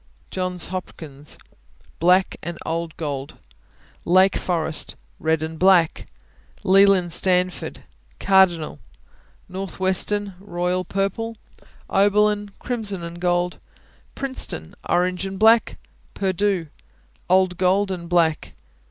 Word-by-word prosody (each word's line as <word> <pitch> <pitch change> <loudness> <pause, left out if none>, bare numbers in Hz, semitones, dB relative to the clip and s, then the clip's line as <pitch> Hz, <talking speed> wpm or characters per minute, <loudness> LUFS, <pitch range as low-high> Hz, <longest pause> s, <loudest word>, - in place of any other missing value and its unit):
Johns 185 -2 -1
Hopkins 155 -6 -6 0.6
Black 180 +3 +3
and 170 0 -6
old 165 0 -3
gold. 140 -3 -5 0.7
Lake 185 +2 +4
Forest 165 -3 -2 0.2
Red 160 0 0
and 160 0 -6
black. 180 -3 +3 0.6
Leland 195 -2 +4
Stanford 180 +1 0 0.4
Cardinal. 180 - +3 0.7
Northwestern 190 +2 -1
Royal 180 -1 -2
Purple. 200 +5 -3 0.5
Oberlin 205 +1 +2
Crimson 210 -7 +1
and 170 +1 -8
gold 175 0 0 0.6
Princeton 260 - -3 0.2
Orange 180 +2 +1
and 195 0 -6
black. 225 +2 +4 0.4
Purdue 195 -2 0 0.6
Old 185 -1 +3
gold 190 +2 +2
and 170 -2 -6
black. 165 -3 +1
185 Hz, 95 wpm, -22 LUFS, 170-195 Hz, 0.7 s, Lake